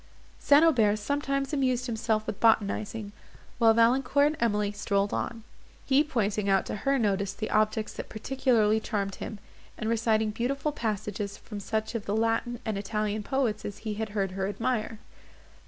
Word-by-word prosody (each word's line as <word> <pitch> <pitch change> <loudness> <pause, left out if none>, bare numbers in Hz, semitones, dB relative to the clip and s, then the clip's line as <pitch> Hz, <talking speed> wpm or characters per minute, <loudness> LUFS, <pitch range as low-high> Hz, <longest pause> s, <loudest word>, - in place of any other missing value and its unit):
St. 290 +2 +5
Aubert 225 -10 +4
sometimes 275 +4 -2
amused 255 -3 +1
himself 220 -2 -1
with 215 -2 -5
botanizing, 215 -1 +1 0.5
while 225 -2 +5
Valancourt 255 +5 +4
and 305 +1 0
Emily 210 -4 +1
strolled 200 -1 0
on; 230 -1 -3 0.4
he 280 +2 +4
pointing 210 -8 -1
out 195 -1 +3
to - - -4
her 275 +6 +1
notice 200 -4 0
the 215 - -5
objects 215 0 +1
that - - -7
particularly 220 -2 +1
charmed 200 -3 -2
him, 215 - -6 0.4
and 215 - -3
reciting 220 -1 +1
beautiful 275 +7 -1
passages 210 -5 -3
from 210 -2 -8
such 220 +3 -2
of 230 -3 -4
the 205 - 0
Latin 225 +2 0
and 215 -3 -2
Italian 210 +1 -2
poets 235 -3 -1
as 205 0 -6
he 215 - -1
had 220 +1 -3
heard 200 -2 -1
her 190 +1 -2
admire. 220 +2 -2
220 Hz, 165 wpm, -28 LUFS, 210-245 Hz, 0.5 s, St